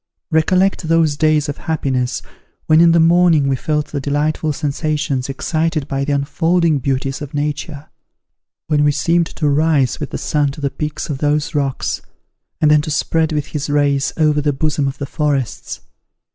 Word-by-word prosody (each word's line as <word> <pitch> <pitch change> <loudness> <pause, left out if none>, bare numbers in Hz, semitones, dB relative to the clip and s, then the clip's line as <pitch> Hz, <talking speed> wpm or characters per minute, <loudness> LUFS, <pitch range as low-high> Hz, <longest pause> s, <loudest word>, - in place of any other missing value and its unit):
recollect 180 +3 +2
those 165 -2 +2
days 155 0 +2
of 145 - -4
happiness, 130 -5 -1 0.4
when 155 +1 +5
in 170 0 +6
the 170 - +4
morning 165 -3 +4
we 135 - +1
felt 150 +3 -2
the 145 - -3
delightful 150 +2 -1
sensations 145 -2 -2
excited 155 +2 -1
by 135 -1 -2
the 145 - -2
unfolding 160 +3 +1
beauties 135 +2 -2
of 145 0 -7
nature; 145 0 -3 0.8
when 150 -2 +1
we 150 - +4
seemed 170 +3 +1
to 155 - -2
rise 145 -3 +2
with 145 - -4
the - - -4
sun 145 -2 0
to 140 - -8
the 140 -2 -2
peaks 150 +2 -4
of 145 -4 -4
those 150 +2 0
rocks, 140 -3 -1 0.6
and 150 -1 +4
then 150 -1 +5
to 155 - -6
spread 160 +1 0
with 150 -2 -1
his 145 -1 -4
rays 145 -2 +1
over 150 -2 +2
the 145 0 +1
bosom 145 0 -1
of 135 - -4
the 140 - -4
forests. 140 -4 -2
150 Hz, 175 wpm, -18 LUFS, 140-160 Hz, 0.8 s, in